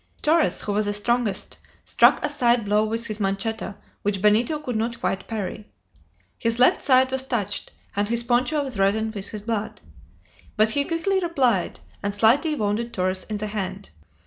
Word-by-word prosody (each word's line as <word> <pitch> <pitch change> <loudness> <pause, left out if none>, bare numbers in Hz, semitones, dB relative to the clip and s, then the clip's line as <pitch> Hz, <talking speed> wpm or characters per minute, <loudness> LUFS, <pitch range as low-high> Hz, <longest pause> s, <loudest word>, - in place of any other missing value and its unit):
Torres, 320 +1 +3
who 205 - -3
was 210 0 0
the 205 - 0
strongest, 220 -1 -1 0.3
struck - - +4
a - - -1
side 240 -5 +2
blow 210 +1 +2
with 225 +2 -1
his 215 -1 -4
manchetta 200 +1 -2 0.2
which 200 -1 -1
Benito 215 - +3
could 255 -5 -5
not 235 +2 -2
quite 195 -5 -2
parry. 210 -1 -5 0.7
His 230 0 0
left 250 - +4
side 260 -1 +4
was 265 0 +1
touched, 220 -7 -2 0.2
and 205 +1 0
his 235 +1 +1
poncho 255 +5 +1
was 255 -7 -5
reddened 220 +3 +1
with 200 -3 -3
his 210 -2 -7
blood. 220 -1 -3 0.8
But 215 +1 +3
he 280 +4 +1
quickly 350 +5 0
replied, 265 - 0 0.2
and 200 0 -3
slightly 270 +9 +3
wounded 220 +1 -2
Torres 185 0 -1
in 215 - -2
the 210 - -3
hand. 200 -2 -5
220 Hz, 175 wpm, -24 LUFS, 205-250 Hz, 0.8 s, struck